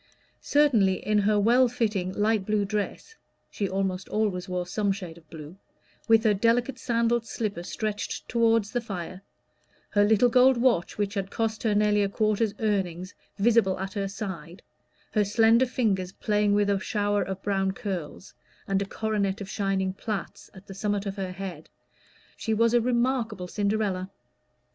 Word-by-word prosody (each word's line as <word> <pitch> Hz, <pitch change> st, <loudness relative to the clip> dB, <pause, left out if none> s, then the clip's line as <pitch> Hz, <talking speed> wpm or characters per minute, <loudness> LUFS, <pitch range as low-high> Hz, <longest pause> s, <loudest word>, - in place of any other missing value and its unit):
Certainly 230 Hz, -11 st, +2 dB
in 210 Hz, 0 st, +2 dB
her 205 Hz, +1 st, +2 dB
well 240 Hz, +5 st, +4 dB
fitting 210 Hz, -6 st, -1 dB
light 210 Hz, 0 st, +1 dB
blue 210 Hz, 0 st, 0 dB
dress 210 Hz, -, -4 dB, 0.4 s
she 200 Hz, -2 st, -2 dB
almost 190 Hz, -1 st, -2 dB
always 200 Hz, -4 st, -1 dB
wore 180 Hz, -1 st, -2 dB
some 200 Hz, +3 st, 0 dB
shade 185 Hz, -4 st, -6 dB
of 165 Hz, -2 st, -19 dB
blue 160 Hz, +2 st, -10 dB, 0.5 s
with 225 Hz, -1 st, +5 dB
her 215 Hz, -2 st, +4 dB
delicate 235 Hz, +5 st, +1 dB
sandaled 235 Hz, -1 st, +1 dB
slipper 210 Hz, -7 st, -3 dB
stretched 210 Hz, +3 st, -4 dB
toward 230 Hz, -2 st, +3 dB
the 240 Hz, +4 st, -3 dB
fire, 185 Hz, -4 st, -6 dB, 0.7 s
her 205 Hz, -, +4 dB
little 220 Hz, +3 st, +4 dB
gold 255 Hz, +1 st, +5 dB
watch, 235 Hz, -8 st, +1 dB
which 205 Hz, -1 st, -1 dB
had 195 Hz, -2 st, -3 dB
cost 220 Hz, 0 st, -2 dB
her 215 Hz, -3 st, +1 dB
nearly 210 Hz, 0 st, +3 dB
a 200 Hz, -, +1 dB
quarter's 215 Hz, 0 st, 0 dB
earnings, 185 Hz, -4 st, -2 dB, 0.2 s
visible 215 Hz, -2 st, +3 dB
at 190 Hz, 0 st, -4 dB
her 200 Hz, -2 st, -2 dB
side, 190 Hz, -4 st, -7 dB, 0.5 s
her 210 Hz, -, +2 dB
slender 225 Hz, +4 st, +4 dB
fingers 195 Hz, -7 st, -1 dB
playing 210 Hz, -1 st, +1 dB
with 205 Hz, 0 st, +2 dB
a 200 Hz, -, +1 dB
shower 205 Hz, 0 st, 0 dB
of 190 Hz, 0 st, -4 dB
brown 195 Hz, -1 st, 0 dB
curls, 190 Hz, -5 st, -6 dB, 0.3 s
and 195 Hz, 0 st, +1 dB
a -, -, -1 dB
coronet 200 Hz, -2 st, -2 dB
of 200 Hz, -, -6 dB
shining 195 Hz, -2 st, -1 dB
plaits, 210 Hz, +1 st, -5 dB
at 190 Hz, +1 st, -13 dB
the 195 Hz, -, -9 dB
summit 205 Hz, +1 st, -2 dB
of 195 Hz, -1 st, -4 dB
her 190 Hz, -2 st, -3 dB
head, 185 Hz, -4 st, -7 dB, 0.7 s
she 220 Hz, -, -2 dB
was 230 Hz, +1 st, +3 dB
a 240 Hz, -, +4 dB
remarkable 235 Hz, -5 st, 0 dB
Cinderella. 200 Hz, -2 st, -1 dB
205 Hz, 165 wpm, -26 LUFS, 190-225 Hz, 0.7 s, with